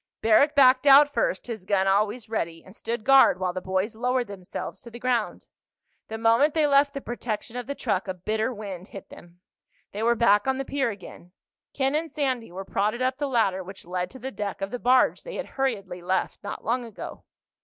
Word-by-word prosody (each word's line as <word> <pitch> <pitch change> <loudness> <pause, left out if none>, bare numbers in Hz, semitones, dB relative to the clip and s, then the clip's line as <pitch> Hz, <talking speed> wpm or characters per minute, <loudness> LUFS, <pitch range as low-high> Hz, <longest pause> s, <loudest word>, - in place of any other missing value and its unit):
Barrack 255 +7 +4
backed 260 0 +5
out 285 +1 +7
first, - - 0
his 225 -5 -6
gun 190 0 +1
always 210 +4 +1
ready, 165 -7 -3
and 190 - -15
stood 230 -1 -4
guard 270 -8 +6
while 185 -1 -1
the 185 - -4
boys 190 +4 -2
lowered 250 +2 0
themselves 195 -4 -7
to 235 - -11
the 235 - -10
ground. 240 -2 -1 0.6
The 220 - -5
moment 230 +7 +3
they 310 -2 +3
left 280 0 +3
the 275 - -4
protection 235 -2 -5
of 245 0 -5
the 280 - -4
truck 200 -7 -2
a 185 - -3
bitter 215 +6 -1
wind 200 -5 -7
hit 195 - -11
them. 175 +1 -15 0.5
They 205 - -5
were 235 +1 +3
back 210 -1 +3
on 265 0 +1
the 270 - -3
pier 270 -3 -1
again. 185 -3 -11 0.4
Ken 270 0 +1
and 320 +2 -1
Sandy 260 - -2
were 190 +2 -7
prodded 215 +6 -1
up 260 +1 -1
the 290 - -1
ladder 195 -7 +1
which 190 +2 -11
led 180 +1 -3
to 260 - -12
the 265 +1 -6
deck 205 -5 -5
of 195 +1 -4
the 245 - -4
barge 250 +2 +3
they - - -8
had - - -4
hurriedly 205 -10 -3
left 185 +2 -1
not 205 - -7
long 245 +3 0
ago. 230 -4 -9
225 Hz, 215 wpm, -25 LUFS, 195-260 Hz, 0.6 s, out